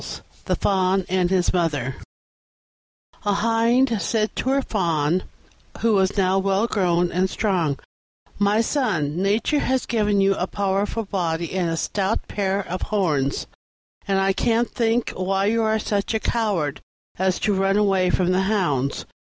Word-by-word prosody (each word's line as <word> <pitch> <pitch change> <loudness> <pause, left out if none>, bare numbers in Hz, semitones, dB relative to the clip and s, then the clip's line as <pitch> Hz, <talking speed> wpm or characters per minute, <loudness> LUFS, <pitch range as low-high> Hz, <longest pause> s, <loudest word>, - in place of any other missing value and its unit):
THE - - +1
FAWN 190 -1 +1
AND 180 -1 +1
HIS 185 -1 +1
MOTHER 145 -7 -1 1.3
A 205 -1 +1
Hind 230 +2 +2
said 215 +4 -1
to 260 - -1
her 275 0 +2
Fawn, 170 -5 0 0.6
who 230 -1 +3
was 190 0 +2
now 190 0 +3
well 195 +2 +1
grown 180 -5 +1
and 185 +2 +1
strong, 180 -10 0 0.6
"My 205 +2 +3
son, 185 - -1
Nature 215 +9 +1
has 260 -2 0
given 210 -3 +1
you 195 0 +4
a 185 -1 -2
powerful 200 +3 -1
body 170 -4 -2
and 180 -3 0
a 165 - -2
stout 195 +5 -1
pair 195 -1 -1
of 185 +2 -4
horns, 155 -10 0 0.6
and 195 -1 +2
I 195 0 +2
can't 230 +4 +1
think 230 0 0
why 195 +1 -1
you 225 +2 +2
are 220 0 +2
such 210 0 -1
a - - +1
coward 200 -12 -1 0.4
as 190 -1 +1
to 210 - +2
run 195 +1 +2
away 195 -3 +2
from 180 0 +1
the 185 +1 +2
hounds." 145 -11 0
195 Hz, 155 wpm, -22 LUFS, 180-215 Hz, 1.3 s, you